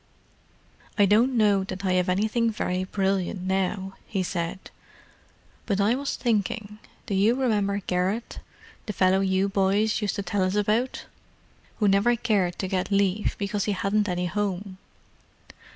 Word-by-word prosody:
"I 205 Hz, -, +6 dB
don't 235 Hz, +6 st, +3 dB
know 205 Hz, -3 st, +3 dB
that 195 Hz, +1 st, -6 dB
I 185 Hz, -, +2 dB
have 180 Hz, 0 st, +1 dB
anything 220 Hz, +5 st, +1 dB
very 185 Hz, -4 st, -2 dB
brilliant 190 Hz, -1 st, -1 dB
now," 190 Hz, +1 st, -2 dB
he 195 Hz, -3 st, -1 dB
said. 175 Hz, +1 st, -4 dB, 1.0 s
"But 200 Hz, -2 st, 0 dB
I 205 Hz, +3 st, +3 dB
was 275 Hz, +2 st, -2 dB
thinking—do 210 Hz, -2 st, -3 dB
you 205 Hz, +5 st, +3 dB
remember 210 Hz, -6 st, +1 dB
Garrett, 185 Hz, +6 st, -1 dB, 0.5 s
the 210 Hz, -, -3 dB
fellow 185 Hz, +1 st, +3 dB
you 190 Hz, 0 st, +1 dB
boys 200 Hz, +3 st, +1 dB
used 210 Hz, -, -1 dB
to 200 Hz, -, -3 dB
tell 195 Hz, +2 st, -1 dB
us 185 Hz, +1 st, +1 dB
about? 215 Hz, +5 st, 0 dB, 0.7 s
who 210 Hz, -, +2 dB
never 200 Hz, +5 st, +4 dB
cared 205 Hz, -7 st, 0 dB
to 190 Hz, -, -3 dB
get 185 Hz, -1 st, -1 dB
leave 200 Hz, 0 st, +1 dB
because 200 Hz, 0 st, -2 dB
he 210 Hz, -, 0 dB
hadn't 205 Hz, +2 st, 0 dB
any 180 Hz, 0 st, -1 dB
home." 195 Hz, 0 st, -3 dB
200 Hz, 150 wpm, -25 LUFS, 190-210 Hz, 1.0 s, I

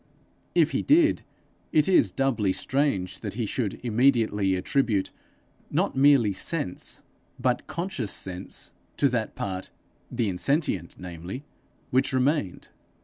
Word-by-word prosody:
If 165 Hz, -2 st, +4 dB
he -, -, 0 dB
did, 315 Hz, +2 st, +4 dB, 0.5 s
it 155 Hz, -1 st, +3 dB
is 190 Hz, -, +4 dB
doubly 120 Hz, -8 st, +1 dB
strange 100 Hz, -11 st, -1 dB
that 105 Hz, -3 st, -6 dB
he 115 Hz, -1 st, -1 dB
should 105 Hz, -1 st, -2 dB
immediately 115 Hz, -5 st, +2 dB
attribute 105 Hz, 0 st, 0 dB, 0.6 s
not -, -, 0 dB
merely 135 Hz, -6 st, +5 dB
sense, 95 Hz, -, -3 dB, 0.4 s
but 125 Hz, -1 st, 0 dB
conscious 170 Hz, -, -3 dB
sense, 95 Hz, 0 st, -4 dB, 0.3 s
to 140 Hz, -, +4 dB
that 115 Hz, -4 st, -2 dB
part, 95 Hz, -1 st, -4 dB, 0.4 s
the 115 Hz, -, -1 dB
insentient, 95 Hz, -, 0 dB
namely, 90 Hz, -, -7 dB, 0.5 s
which 130 Hz, +1 st, +2 dB
remained. 130 Hz, -, 0 dB
120 Hz, 120 wpm, -26 LUFS, 95-140 Hz, 0.6 s, merely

